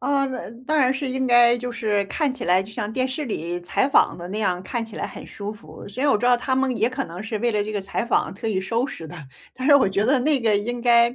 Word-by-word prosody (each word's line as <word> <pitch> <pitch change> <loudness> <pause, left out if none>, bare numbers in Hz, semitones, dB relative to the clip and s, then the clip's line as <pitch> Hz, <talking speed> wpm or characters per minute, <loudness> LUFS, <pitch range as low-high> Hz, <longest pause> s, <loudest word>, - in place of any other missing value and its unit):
呃， 280 -1 +1 0.4
当 310 0 +2
然 260 -2 +4
是 270 +1 -3
应 260 0 -1
该 240 -1 +6
就 245 +1 -4
是， 215 -3 0
看 295 - 0
起 255 -2 -6
来 185 +2 +4
就 210 - -11
像 210 -2 -3
电 255 +2 0
视 270 +3 -4
里 175 -5 -3
采 175 +9 0
访 - - +3
的 175 - -8
那 205 +3 -4
样， 185 -4 0
看 235 +4 -3
起 225 -2 -10
来 - - -3
很 - - -10
舒 205 0 -6
服， 215 +1 -12
所 235 +6 -5
以 290 - +3
我 275 - +4
知 245 - -3
道 250 - +6
他 260 +2 -1
们 265 -1 +1
也 230 - +2
可 265 +2 -3
能 175 +4 -8
是 220 0 -4
为 235 +2 0
了 210 -1 +1
这 210 - -5
个 205 - -2
采 195 +4 -2
访 - - +1
特 215 +3 -5
意 205 -3 0
收 230 +7 -1
拾 165 - -8
的。 175 - -10 0.4
但 260 - -4
是 285 - +8
我 280 - +5
觉 200 +2 0
得 265 0 +4
那 285 +1 +2
个 220 -3 +3
应 240 +4 -3
该 235 0 +4
235 Hz, 310 characters per minute, -23 LUFS, 205-260 Hz, 0.4 s, 是